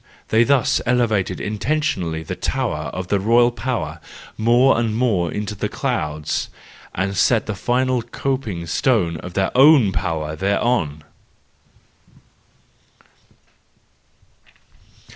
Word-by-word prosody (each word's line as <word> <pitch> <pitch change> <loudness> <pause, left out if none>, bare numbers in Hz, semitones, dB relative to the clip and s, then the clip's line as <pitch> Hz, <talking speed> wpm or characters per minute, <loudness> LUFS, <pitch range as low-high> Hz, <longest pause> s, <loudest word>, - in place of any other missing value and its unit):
They 110 +1 +4
thus 135 -1 +2
elevated 115 -6 +1
intentionally 105 - -2
the - - -5
tower - - -2
of 90 0 -6
the 100 - +2
royal 120 +4 +4
power 110 -10 -4 0.4
more 120 +3 +3
and 115 -2 -1
more 105 -8 +1
into 105 0 -4
the 105 - -3
clouds, 75 0 -2 0.5
and 100 +2 -2
set 115 +4 +2
the 110 - -3
final 125 +4 0
coping 120 -7 -3
stone 85 -4 +1
of 90 +2 -9
their 95 -1 0
own 135 -6 +6
power 80 -4 -3
thereon. 95 -5 0
105 Hz, 105 wpm, -20 LUFS, 85-120 Hz, 0.5 s, own